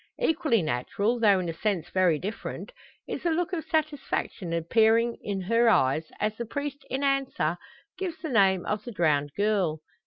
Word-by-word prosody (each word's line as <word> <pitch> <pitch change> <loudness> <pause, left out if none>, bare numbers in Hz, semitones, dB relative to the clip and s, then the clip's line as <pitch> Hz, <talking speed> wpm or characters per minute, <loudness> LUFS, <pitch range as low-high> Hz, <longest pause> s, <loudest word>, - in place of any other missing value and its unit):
Equally 315 - +2
natural, 200 - -1
though 205 -4 +5
in 180 - -3
a 165 - -2
sense 175 -2 -2
very 185 -4 +3
different, 205 - -6 0.4
is - - -4
the 345 - 0
look 345 +3 -1
of 325 -3 -2
satisfaction 290 - -2
appearing 225 +8 +2
in 195 -2 -3
her 230 +5 +3
eyes, 145 -4 +2
as 215 +1 0
the 235 - -3
priest 285 +2 -4
in 265 +2 -2
answer 270 - +1 0.4
gives 355 -4 -3
the 320 - -6
name 195 -6 +3
of 210 0 -2
the 240 - -7
drowned 150 -7 +1
girl. 200 -7 +1
215 Hz, 175 wpm, -27 LUFS, 175-275 Hz, 0.4 s, though